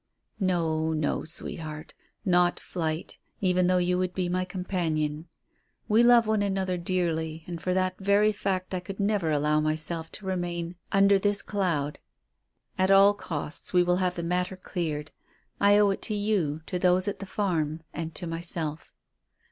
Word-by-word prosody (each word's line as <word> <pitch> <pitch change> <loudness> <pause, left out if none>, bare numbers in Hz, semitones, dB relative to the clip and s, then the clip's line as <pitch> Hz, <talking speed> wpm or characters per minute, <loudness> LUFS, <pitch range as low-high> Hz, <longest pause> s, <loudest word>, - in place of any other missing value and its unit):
"No, 160 -4 +1
no, 155 -1 -1
sweetheart. 155 -1 -7 0.3
Not 180 -2 +3
flight, 160 -2 -4 0.2
even 180 -2 +2
though 185 0 +3
you 180 0 +1
would 185 -1 -2
be 180 -2 -1
my 185 +1 0
companion. 165 -4 -2 0.6
We 215 +2 +4
love 240 -1 +6
one 215 -1 +1
another 190 -2 0
dearly, 165 -3 -1
and 170 -2 -6
for 185 +1 0
that 185 0 0
very 200 +2 +3
fact 190 -2 -2
I 185 - 0
could 190 +3 -8
never 200 -4 +1
allow 150 0 +2
myself 155 +2 0
to 205 - -4
remain 175 -2 -3 0.2
under 195 0 +5
this 205 +1 +1
cloud. 165 -8 -1 0.8
At 185 0 +3
all 195 +1 +7
costs 155 -5 -4
we 180 0 +5
will 180 0 +2
have 180 -1 0
the 170 - -4
matter 180 +2 -1
cleared. 155 -5 -4 0.5
I 205 0 +6
owe 205 -1 +5
it 195 - -4
to 215 - -1
you, 195 -8 0
to 180 - -3
those 180 +1 +3
at 205 - -2
the 195 - -7
farm, 165 -7 -1
and 165 0 -5
to 180 - -3
myself." 165 -2 -4
180 Hz, 165 wpm, -27 LUFS, 160-195 Hz, 0.8 s, all